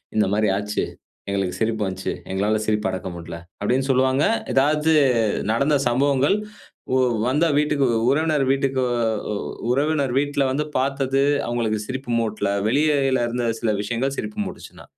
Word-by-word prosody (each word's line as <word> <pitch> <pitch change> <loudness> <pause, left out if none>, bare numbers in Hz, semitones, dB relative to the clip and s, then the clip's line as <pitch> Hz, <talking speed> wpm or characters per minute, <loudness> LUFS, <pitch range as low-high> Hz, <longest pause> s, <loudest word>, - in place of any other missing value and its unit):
இந்த 110 - +3
மாரி 105 +1 +2
ஆச்சு. 105 +1 -2 0.5
எங்களுக்கு 95 -2 -1
சிரிப்பு 110 -1 0
வந்துச்சு. 95 0 -3 0.2
எங்களால 105 +3 +1
சிரிப்ப 105 -1 0
அடக்க 95 0 -5
முடியல." 85 0 -7 0.2
அப்படீன்னு 130 +6 0
சொல்லுவாங்க. 130 +2 +2 0.3
ஏதாச்சு 150 +3 +3 0.6
நடந்த 140 +6 +2
சம்பவங்கள் 140 +6 +2 0.6
ஒ - - +3 0.3
வந்தா 150 +6 +2
வீட்டுக்கு 150 -2 +2 0.2
உறவினர் 150 -1 +2
வீட்டுக்கு 135 -1 0 0.5
அ - - -2 0.4
உறவினர் 140 -1 +1
வீட்ல 145 0 0
வந்து 150 +3 -1
பார்த்தது, 135 0 0 0.2
அவங்களுக்கு 115 -2 -1
சிரிப்பு 130 0 -5
மூட்டல. 110 -3 -1 0.2
வெளியிலருந்த 130 -3 +1
சில 110 -2 +1
விஷயங்கள் 120 +6 -2
சிரிப்பு 210 0 -5
மூட்டுச்சுனா. - - -10
130 Hz, 130 wpm, -22 LUFS, 110-140 Hz, 0.6 s, இந்த